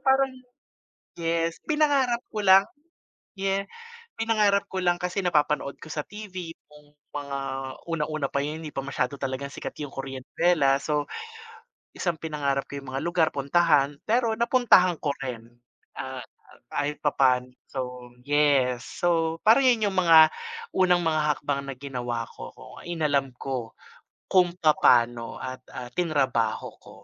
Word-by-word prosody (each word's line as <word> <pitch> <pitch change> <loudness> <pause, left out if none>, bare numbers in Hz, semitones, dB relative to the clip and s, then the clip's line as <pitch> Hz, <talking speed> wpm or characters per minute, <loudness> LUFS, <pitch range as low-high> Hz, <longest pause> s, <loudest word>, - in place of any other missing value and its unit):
parang 270 0 +3 0.9
yes, 165 0 -1
pina-ngarap 280 -6 +2
ko 215 - -5
lang. 190 +1 +7 0.7
Yeah. 195 0 -1 0.5
Pina-ngarap 215 -3 +2
ko 190 - -5
lang 175 -1 +1
kasi 180 +2 -2
napa-panood 150 -4 +1
ko 155 - -10
sa 150 -1 -4
TV 185 -5 -7 0.2
kung 150 0 -19 0.2
mga 140 -1 -4 0.5
unang-una 155 -3 -1
pa 140 0 -1
yun 155 +2 -5
hindi 155 - -6
pa 135 -2 -5
masyado 140 0 -2
talagang 135 +1 -4
sikat - - -7
yung 145 - -4
Korean 135 -1 -6
novela. 140 -3 +2
So, 150 +1 -2 0.8
tas - - -8
ang 175 - +2
pinangarap 140 -3 -1
ko 140 - -5
yung 135 -1 -9
mga 135 - -2
lugar, 170 -2 +2
puntahan, 145 0 +2
pero 230 -1 +1
na-puntahan 235 -8 +4
ko 150 - 0
rin, 120 -4 -6 0.5
ah, 130 -1 -5
ah, - - -20
kahit 145 +1 -2
papano. 130 -3 +2 0.2
So 125 -2 -6
yes. 140 -4 +2
So, 165 -2 0
parang 235 +5 +5
yun 220 -5 +3
yung 190 - -3
mga 165 -3 +7 0.5
unang 180 -2 +4
mga 160 -1 +1
hakbang 140 -1 -3
na 135 - -5
ginawa 125 -3 -4
ko, - - -10
kung - - -13
inalam 150 -5 0
ko 125 -3 -5 0.6
kung 180 -2 +4
papano 120 -6 +3
at, 130 -1 -5 0.2
ah, 125 -1 -7
tina-rabaho 135 -8 0
ko. - - -16
150 Hz, 145 wpm, -26 LUFS, 135-180 Hz, 0.9 s, lang